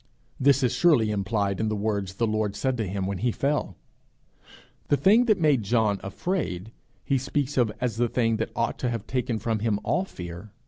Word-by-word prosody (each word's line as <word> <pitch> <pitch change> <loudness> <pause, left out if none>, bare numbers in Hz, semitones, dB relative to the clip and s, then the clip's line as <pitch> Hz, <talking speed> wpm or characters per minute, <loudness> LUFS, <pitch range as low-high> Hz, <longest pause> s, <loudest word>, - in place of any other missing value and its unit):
This 135 0 +4
is 125 - +2
surely 135 -11 +4
implied 100 -1 -1
in 110 - 0
the 110 - -1
words 100 -3 -2
the 115 - +1
Lord 110 -2 -1
said 130 +5 0
to 110 -3 -2
him 95 0 -2
when 95 -1 -3
he 120 +1 +1
fell! 145 +6 -1 1.1
The 145 - +3
thing 215 - +5
that 215 -5 +3
made 150 -7 +3
John 105 -2 +1
afraid, 100 - -3 0.3
he 135 -2 +1
speaks 135 +1 -2
of 120 -4 +2
as 125 -3 -2
the 120 0 +1
thing 115 -2 +1
that 110 - -2
ought 115 0 -1
to 125 - 0
have 115 -3 -4
taken 125 -2 -1
from 110 0 -1
him 105 -1 0
all 180 - +1
fear. 90 - -9
115 Hz, 200 wpm, -26 LUFS, 100-130 Hz, 1.1 s, thing